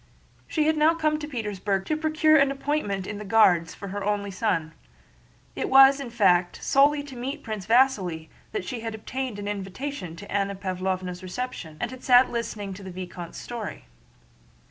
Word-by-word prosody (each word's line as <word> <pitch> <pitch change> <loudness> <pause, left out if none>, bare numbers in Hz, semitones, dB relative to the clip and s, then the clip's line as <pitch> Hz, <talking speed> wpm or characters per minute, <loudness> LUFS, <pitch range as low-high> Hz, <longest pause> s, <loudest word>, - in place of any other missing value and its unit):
She 310 -2 0
had 315 0 +2
now 310 +2 +4
come 305 -2 +1
to 295 - -5
Petersburg 205 -7 -2
to 310 - 0
procure 310 0 +3
an 275 -2 +5
appointment 275 -9 -2
in 205 +1 -5
the - - -6
Guards 185 -6 +4
for 200 - -8
her 200 +1 -4
only 205 0 -1
son. 175 -6 -1 0.8
It - - -2
was, 270 +1 +8
in 275 -3 -5
fact, 180 -6 +3
solely 285 +1 +4
to 280 -2 -10
meet 270 +5 -5
Prince 215 -4 -5
Vasíli 205 -10 +2 0.2
that 410 - -3
she 250 - -4
had 225 -1 -5
obtained 250 +1 -4
an 205 0 -5
invitation 200 - -5
to 200 +4 -11
Anna 200 0 0
Pávlovna's 185 -1 -3
reception 185 -5 -6
and 240 - -2
had 255 -1 -10
sat 250 0 +6
listening 215 -4 -4
to 195 - -10
the 190 - -7
vicomte's 180 -2 -7
story. 235 -3 -6
215 Hz, 180 wpm, -26 LUFS, 190-270 Hz, 0.8 s, was